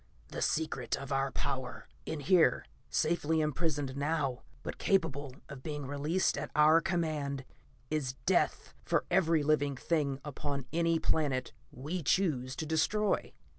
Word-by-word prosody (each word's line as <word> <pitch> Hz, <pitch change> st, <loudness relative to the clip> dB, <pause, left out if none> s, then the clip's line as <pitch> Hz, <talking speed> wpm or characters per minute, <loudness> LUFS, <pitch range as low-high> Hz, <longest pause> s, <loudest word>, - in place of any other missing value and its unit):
"The -, -, -5 dB
secret 160 Hz, -2 st, 0 dB
of 140 Hz, 0 st, -7 dB
our 135 Hz, 0 st, +1 dB
power. 130 Hz, -1 st, -3 dB, 0.2 s
In 155 Hz, -2 st, -3 dB
here, 180 Hz, +3 st, +4 dB, 0.2 s
safely 160 Hz, 0 st, +1 dB
imprisoned 150 Hz, -3 st, -1 dB
now, 140 Hz, -3 st, -1 dB, 0.2 s
but -, -, -5 dB
capable 145 Hz, -8 st, 0 dB
of 140 Hz, -2 st, -9 dB
being 150 Hz, -1 st, -4 dB
released 145 Hz, +5 st, 0 dB
at 150 Hz, -, -4 dB
our 155 Hz, +2 st, +6 dB
command, 155 Hz, -7 st, -1 dB, 0.5 s
is 145 Hz, -5 st, 0 dB
death -, -, +1 dB
for -, -, +1 dB
every 165 Hz, -4 st, +3 dB
living 145 Hz, -2 st, +2 dB
thing 145 Hz, -3 st, 0 dB
upon 140 Hz, -1 st, -3 dB
any 165 Hz, 0 st, +3 dB
planet 140 Hz, -5 st, 0 dB, 0.2 s
we 155 Hz, +8 st, -4 dB
choose 135 Hz, -6 st, +1 dB
to 160 Hz, -, -3 dB
destroy." 160 Hz, +7 st, +1 dB
150 Hz, 135 wpm, -32 LUFS, 140-160 Hz, 0.5 s, our